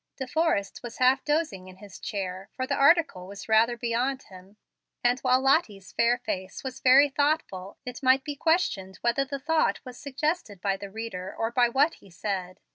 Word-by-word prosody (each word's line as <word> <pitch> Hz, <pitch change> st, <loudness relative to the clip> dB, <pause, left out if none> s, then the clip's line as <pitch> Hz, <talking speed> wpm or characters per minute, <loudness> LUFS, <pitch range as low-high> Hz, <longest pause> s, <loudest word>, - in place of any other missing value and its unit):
De 265 Hz, -, -3 dB
Forrest 255 Hz, -9 st, 0 dB
was 240 Hz, -2 st, -8 dB
half 255 Hz, +1 st, +3 dB
dozing 295 Hz, -, -1 dB
in 185 Hz, -, -12 dB
his 195 Hz, 0 st, -13 dB
chair, 190 Hz, -1 st, -5 dB
for 260 Hz, -, -2 dB
the -, -, -2 dB
article 280 Hz, -, +3 dB
was 200 Hz, 0 st, -9 dB
rather 225 Hz, +2 st, +3 dB
beyond 245 Hz, +3 st, -1 dB
him; 190 Hz, +2 st, -14 dB, 0.5 s
and 245 Hz, +1 st, +3 dB
while 255 Hz, -1 st, +3 dB
Lottie's 225 Hz, -, +1 dB
fair 235 Hz, +1 st, +2 dB
face 190 Hz, -5 st, -5 dB
was 265 Hz, 0 st, -6 dB
very 265 Hz, +2 st, +6 dB
thoughtful, 280 Hz, -, -1 dB
it 250 Hz, 0 st, -7 dB
might 260 Hz, 0 st, +4 dB
be 295 Hz, -1 st, -5 dB
questioned 280 Hz, -, 0 dB
whether 240 Hz, +3 st, +1 dB
the 280 Hz, +1 st, -4 dB
thought 315 Hz, +4 st, +1 dB
was 250 Hz, -1 st, -10 dB
suggested 280 Hz, -, -3 dB
by 195 Hz, +1 st, 0 dB
the 200 Hz, 0 st, -8 dB
reader 195 Hz, -3 st, -6 dB
or 225 Hz, 0 st, -1 dB
by 245 Hz, 0 st, +3 dB
what 285 Hz, +7 st, +3 dB
he 195 Hz, -, -18 dB
read. 185 Hz, -3 st, -3 dB
245 Hz, 190 wpm, -27 LUFS, 195-275 Hz, 0.5 s, very